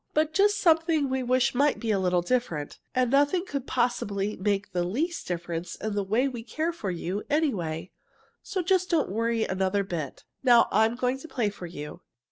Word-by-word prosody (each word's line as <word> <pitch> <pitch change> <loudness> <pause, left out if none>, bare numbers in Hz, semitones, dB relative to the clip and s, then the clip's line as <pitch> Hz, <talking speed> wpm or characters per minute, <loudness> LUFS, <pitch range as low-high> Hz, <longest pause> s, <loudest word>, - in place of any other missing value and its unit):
But 310 +1 +2
just 410 +1 +4
something 325 -5 +3
we 265 0 0
wish 255 0 +2
might 285 +3 +2
be 230 -2 -1
a 200 - +2
little 180 -2 +1
different. 175 - -2 0.2
And 250 -1 +2
nothing 290 +7 +3
could 280 -6 -4
possibly 210 -4 0
make 200 0 -1
the 175 -1 0
least 295 - -2
difference 170 -1 -4
in 215 -1 -4
the 205 -1 0
way 220 +8 +1
we 245 -4 -5
care 310 +9 -2
for 215 - -4
you, 180 +3 -3
anyway, 190 - -1 0.5
so 380 -3 -3
just 370 0 +2
don't 320 - +1
worry 230 +1 0
another 190 +1 0
bit. 165 -7 -5 0.2
Now 240 -3 +6
I'm 220 +3 +3
going 255 +1 -1
to 325 - -10
play 230 -9 -1
for 185 -3 -8
you." 150 +1 -8
235 Hz, 190 wpm, -27 LUFS, 190-285 Hz, 0.5 s, Now